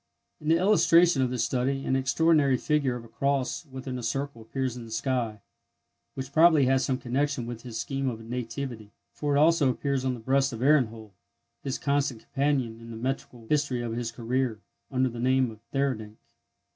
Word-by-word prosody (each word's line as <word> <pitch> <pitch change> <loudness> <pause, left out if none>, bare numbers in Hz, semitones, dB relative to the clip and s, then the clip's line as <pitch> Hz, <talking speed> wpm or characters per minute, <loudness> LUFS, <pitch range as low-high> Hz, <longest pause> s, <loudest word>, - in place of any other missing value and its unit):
In 150 - -8
the 165 +1 +5
illustration 175 -5 +5
of 130 - +2
this 125 -2 -1
study 130 +3 -1
an 130 - +1
extraordinary 140 +1 +3
figure 140 -2 +1
of 120 -1 -7
a - - -12
cross 140 +6 -1
within 130 -1 -6
a - - -5
circle 135 +1 -3
appears 130 +2 -3
in 120 - -7
the 115 - -11
sky, 115 -2 -2 0.7
which 135 0 -6
probably 160 -3 +6
has 130 0 +3
some 130 - 0
connection 130 +1 -1
with 120 -1 -6
his 115 -2 -6
scheme 135 +3 -2
of 115 -3 -5
nativity, 115 -1 -5 0.2
for 145 -1 -1
it - - +4
also 155 -2 +4
appears 135 +1 -1
on 130 -1 0
the - - -9
breast 135 +3 +1
of 115 +2 -4
Ehrenhold, 115 -7 +2 0.5
his 135 -2 -3
constant 140 -5 0
companion 135 -5 -1
in 115 - -11
the 115 - -7
metrical 125 -1 -4
history 140 -4 0
of 115 -1 -3
his 115 -1 -3
career, 120 -1 -1 0.3
under 130 -1 +1
the 120 -1 -6
name 130 0 +2
of 110 - -13
Theurdank. 120 -6 -2
130 Hz, 190 wpm, -27 LUFS, 115-140 Hz, 0.7 s, probably